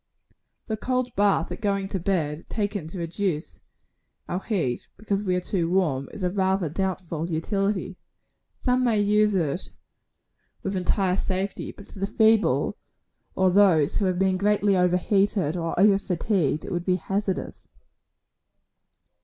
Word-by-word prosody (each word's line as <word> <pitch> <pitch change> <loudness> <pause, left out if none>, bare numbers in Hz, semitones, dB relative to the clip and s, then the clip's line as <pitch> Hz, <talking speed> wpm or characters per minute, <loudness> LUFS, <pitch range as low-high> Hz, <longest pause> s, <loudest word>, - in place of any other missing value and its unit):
The 220 - -3
cold 250 +1 -1
bath 200 -4 +2
at - - -6
going 200 -2 0
to 195 - -2
bed, 165 -4 -2
taken 205 -6 -2
to 170 - -8
reduce 170 - -3 0.7
our 180 - -2
heat, 170 - -2
because 205 0 -2
we 185 -3 +1
are - - +1
too 175 -2 -1
warm, 155 -8 +1
is 200 - -7
of 180 +2 -1
rather 190 -3 +1
doubtful 175 -2 -3
utility. 195 +3 -1 0.6
Some 250 0 +1
may 230 -4 +2
use 210 0 +3
it 165 -1 -1 0.9
with 195 0 -2
entire 185 0 +1
safety; 190 +1 -2
but 200 - -14
to - - -12
the 195 - 0
feeble, 220 +1 +3 0.6
or 190 -1 +3
those 180 -7 +4
who 205 - +1
have 185 -1 +1
been 190 0 +2
greatly 205 0 +2
over 180 -1 +3
heated 195 -4 +1
or 165 -1 -2
over 200 0 +5
fatigued, 175 -5 0
it - - -6
would 175 -1 -1
be 185 0 +2
hazardous. 195 0 -3
190 Hz, 150 wpm, -25 LUFS, 175-205 Hz, 0.9 s, over